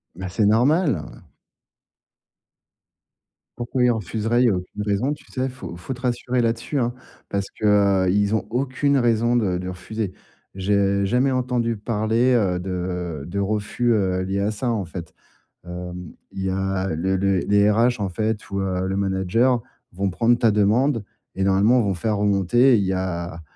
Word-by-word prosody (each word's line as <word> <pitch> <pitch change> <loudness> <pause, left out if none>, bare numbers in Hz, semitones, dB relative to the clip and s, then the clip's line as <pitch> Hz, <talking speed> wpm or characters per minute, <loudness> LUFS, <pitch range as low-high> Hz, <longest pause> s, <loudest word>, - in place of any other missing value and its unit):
Bah, 95 0 -6
c'est 105 +3 +1
normal, 135 - +3 0.2
ouais. - - -15 2.4
Pourquoi 120 +1 -1
ils 125 - +4
refuseraient? 110 +2 -1
Il - - +4
y - - +5
a 100 - +1
aucune 90 +3 -6
raison, 105 +8 0
tu 150 - -13
sais? 130 0 -1
Faut 125 -9 -8
faut 110 +9 -5
te 125 - -12
rassurer 125 0 0
là-dessus, 115 +5 -1
hein, 120 -2 0 0.4
parce 100 -1 -2
que, 110 - -5 0.4
heu, 90 - +2
ils 100 +2 +2
ont 110 - -1
aucune 135 +3 0
raison 120 -1 +2
de 95 -6 0
de 90 0 -5
refuser. 95 +2 -5 0.4
J'ai 100 0 +1
jamais 125 +6 +2
entendu 125 -3 0
parler, 115 +3 +1
heu, 95 -7 +2
de 90 -4 -4
de 100 +3 -4
refus, 105 +4 0
heu, 95 -3 +1
lié 95 +1 -2
à 105 +2 0
ça, 120 +3 -2
en 110 -4 -1
fait. 85 -1 -8 0.5
Hem, 90 -1 -7 0.2
il 95 - -5
y - - 0
a 95 0 -1
le 95 +4 0
le 95 0 +1
les 100 +3 +3
RH, 115 +3 +2
en 100 - -1
fait, 110 +3 -2
ou 100 - -1
heu, 95 -1 -1
le 95 - -2
manager 100 +6 +1 0.3
vont 95 +2 -1
prendre 120 +5 +2
ta 115 -2 +3
demande 110 +4 +2 0.3
et 95 - -1
normalement 100 +6 +4
vont 100 -3 0
faire 105 +5 -1
remonter. 105 +5 +3
Il 100 - 0
y 95 - 0
a 85 -3 -3
105 Hz, 180 wpm, -22 LUFS, 95-120 Hz, 2.4 s, y